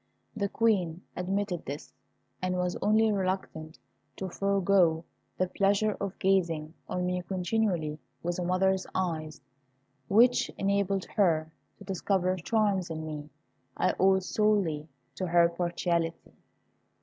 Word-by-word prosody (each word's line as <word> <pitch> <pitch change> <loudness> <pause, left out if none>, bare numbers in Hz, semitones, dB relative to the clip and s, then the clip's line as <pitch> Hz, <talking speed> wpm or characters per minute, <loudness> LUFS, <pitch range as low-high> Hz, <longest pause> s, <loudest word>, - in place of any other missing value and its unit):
The 200 -2 -1
Queen 190 -7 +1
admitted 190 0 -2
this, 140 +2 -7 0.5
and 185 0 -1
was 180 0 -1
only 215 +1 +4
reluctant 185 -5 -3 0.4
to 190 - -4
forego 190 -4 +2 0.3
the 185 - +2
pleasure 200 +3 +1
of 200 -1 -3
gazing 170 -5 +1 0.2
on 180 0 -1
me 180 0 -1
continually 180 -4 -1 0.2
with 175 +1 -2
a - - -1
mother's 190 +1 +1
eyes, 160 -4 -2 0.7
which 240 +6 +4
enabled 200 -1 +1
her 160 -5 +3 0.3
to - - -12
discover 190 -1 0
charms 200 -1 +1
in 160 -1 -4
me 150 -1 -6 0.5
I - - +2
owed 190 0 +4
solely 190 -8 +1 0.3
to 185 - -2
her 170 0 +5
partiality. 170 -1 -2
185 Hz, 125 wpm, -29 LUFS, 170-200 Hz, 0.7 s, her